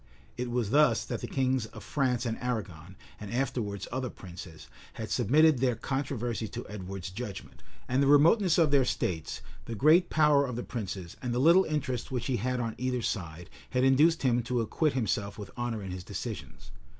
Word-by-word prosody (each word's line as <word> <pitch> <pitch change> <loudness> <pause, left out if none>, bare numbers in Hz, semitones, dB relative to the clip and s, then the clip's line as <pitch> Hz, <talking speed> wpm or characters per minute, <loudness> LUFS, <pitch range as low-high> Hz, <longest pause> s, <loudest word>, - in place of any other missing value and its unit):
It 125 0 -3
was 120 -3 -1
thus 150 +2 +4
that - - -4
the - - -4
kings 130 -3 0
of - - -11
France 130 -4 0
and 115 -1 -1
Arragon, 100 -8 -4 0.2
and 105 -2 -7
afterwards 120 -5 -2
other 130 0 -2
princes, 85 -5 -11 0.3
had 110 - -6
submitted 145 +5 +4
their 125 -2 +2
controversies 120 -5 -3
to - - -7
Edward's 95 -3 -6
judgment; 105 0 -7 0.3
and 130 +2 +1
the 140 - +3
remoteness 165 +6 +5
of 160 -4 +4
their 140 -2 +5
states, 85 -9 -2 0.2
the 115 - -5
great 160 - +5
power 150 -2 +4
of 125 - -4
the 120 - -3
princes, 95 -7 -6
and 120 -1 -2
the - - +1
little 170 +7 +6
interest 140 -6 -2
which 125 -3 -2
he 130 -3 0
had 125 +4 -1
on 115 -2 -2
either 125 -1 -1
side, 85 -6 -4 0.2
had 125 0 +1
induced 150 +5 +4
him 120 -2 +3
to 120 +1 -1
acquit 150 +6 0
himself 105 -5 -1
with 105 -2 -8
honor 120 -3 -3
in 95 - -5
his 90 -1 -6
decisions. - - -7
125 Hz, 190 wpm, -29 LUFS, 105-135 Hz, 0.3 s, little